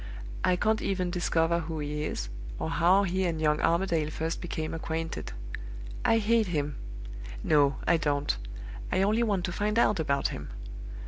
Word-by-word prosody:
I 180 - +4
can't 220 +4 +2
even 185 -2 0
discover 170 -1 +2
who 160 -1 -4
he 150 0 -2
is, - - -3 0.3
or 160 - -2
how 180 +4 +5
he 190 0 0
and 165 -2 0
young 150 -1 +2
Armadale 170 -3 +2
first 160 +2 -2
became 160 -2 -3
acquainted. 165 0 -3 0.7
I 225 - +5
hate 225 0 +3
him. 150 -4 -1 0.7
No, 145 -2 +4
I 170 - +5
don't; 145 - +1 0.6
I 190 - +3
only 215 +4 +3
want 200 -6 +1
to 185 - -2
find 210 +4 0
out 210 -5 +4
about 140 -3 +1
him. - - -6
170 Hz, 165 wpm, -29 LUFS, 155-190 Hz, 0.7 s, how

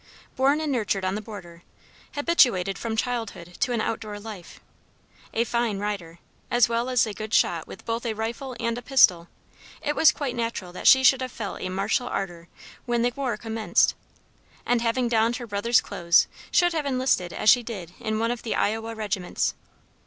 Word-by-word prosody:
Born 275 +3 +3
and 310 -2 -2
nurtured 210 -6 0
on 185 - 0
the 210 - -3
border, 185 -6 -10 0.5
habituated 240 - +3
from 225 -1 -3
childhood 220 -8 -3
to 250 - +1
an 235 -2 0
outdoor 215 -2 -4
life, 205 -4 -10 0.7
a 230 - +1
fine 235 -3 -1
rider, 195 -5 -4 0.3
as 240 -2 +4
well 235 +2 -1
as 250 -2 +3
a 215 - -5
good 215 +2 -3
shot - - +2
with - - -11
both 230 +1 -2
a 220 - -2
rifle 235 +4 -4
and 230 +1 -1
a - - -10
pistol, 185 -10 +4 0.5
it 295 - -2
was 320 - +6
quite 275 -4 -4
natural 230 -6 -3
that - - -2
she 265 0 +8
should 260 +1 +5
have 255 -1 -4
felt 210 -4 -6
a 185 - -3
martial 200 +6 0
ardor 175 -6 -4 0.4
when 240 -1 +1
the 245 0 +1
war 260 -6 -2
commenced, 220 -4 +1 0.7
and 240 -1 +2
having 240 +1 +1
donned 230 0 +2
her 245 - -6
brother's 225 +2 +2
clothes, 170 0 +3 0.2
should 350 -1 +3
have 305 -3 -1
enlisted 255 -9 +1
as - - -4
she 245 - +4
did 195 -8 -7
in 220 -2 -2
one 230 +1 0
of 245 - -4
the 230 - -2
Iowa 225 +2 -1
regiments. 200 -4 -2
225 Hz, 190 wpm, -25 LUFS, 200-245 Hz, 0.7 s, she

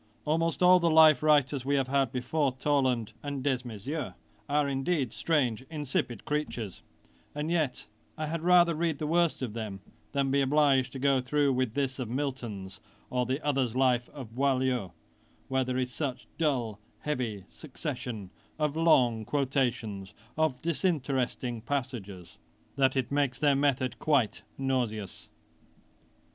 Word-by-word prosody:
Almost 165 +3 +1
all 180 0 +7
the 170 -1 +2
life 155 -1 +7
writers 145 -3 +3
we 140 +2 +1
have 135 -2 +1
had 135 -2 +1
before 130 +2 0
Toland 130 -4 0
and 140 -2 -4
Desmaiseaux, 125 - -3 0.3
are 145 0 +2
indeed 135 -2 -1
strange 130 -9 +1
insipid 135 -7 -2
creatures; 125 -9 -3 0.5
and 150 +2 -2
yet 155 -7 0 0.3
I 155 - -2
had 160 +1 -3
rather 175 0 +5
read 160 -1 0
the 155 - -3
worst 170 -2 +1
of 115 -5 -3
them, 110 -4 -5 0.3
than 140 -1 0
be 140 +1 +3
obliged 135 -2 +3
to - - -5
go 135 0 +2
through 140 +1 +2
with 125 -3 -1
this 135 -2 -1
of 125 -4 -3
Milton's, 120 -8 -4 0.3
or 125 -1 0
the 135 +4 -2
other's 135 -5 +1
life 125 -2 +2
of 125 -6 -10
Boileau, 130 -6 0 0.6
where 130 0 +2
there 125 0 -2
is 125 -1 -2
such 130 -5 -3
a - - -27
dull, 125 -9 0 0.2
heavy 120 -10 -3
succession 125 - -6 0.3
of 150 -1 0
long 125 -9 +4
quotations 120 -7 -1 0.2
of 155 -5 0
disinteresting 135 - -1
passages, 115 -9 -5 0.4
that 135 -1 +3
it 130 -2 -1
makes 140 -3 +1
their 145 +1 +3
method 135 -2 0
quite 140 -9 +1 0.2
nauseous. 120 -7 -2
135 Hz, 145 wpm, -29 LUFS, 125-150 Hz, 0.6 s, all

